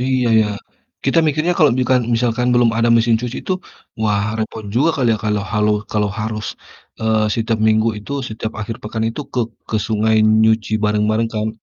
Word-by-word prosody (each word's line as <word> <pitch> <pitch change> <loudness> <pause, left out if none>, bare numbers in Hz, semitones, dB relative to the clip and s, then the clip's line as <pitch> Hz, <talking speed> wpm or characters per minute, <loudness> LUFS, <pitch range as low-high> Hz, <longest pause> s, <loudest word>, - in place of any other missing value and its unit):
iya 130 -1 +1
ya, 105 - +2 0.6
kita 165 - +2
mikirnya 155 +4 +1
kalau 150 -4 +5
bukan, 130 0 +3
misalkan 120 +1 0
belum 120 -1 +4
ada 115 +1 +2
mesin 115 0 +3
cuci 125 +1 -4
itu - - -1 0.5
wah 105 -2 +1
repot 110 0 -4
juga 140 +7 +3
kali 125 -3 +1
ya - - -4
kalau 105 -1 0
halu 105 0 +2 0.2
kalau 105 -1 +1
harus, 110 -1 -3 0.5
eee, 110 -1 +2
setiap 115 -1 -1
Minggu 110 +1 +3
itu 105 +7 -8 0.2
setiap 110 0 -5
akhir 110 +1 -4
pekan 110 +1 -3
itu 115 +6 -5
ke 125 - 0 0.3
ke 110 - 0
sungai 110 0 +1 0.3
nyuci 110 -1 +2
bareng-bareng 105 +2 +1
kan. 110 0 -1
110 Hz, 180 wpm, -18 LUFS, 110-120 Hz, 0.6 s, kalau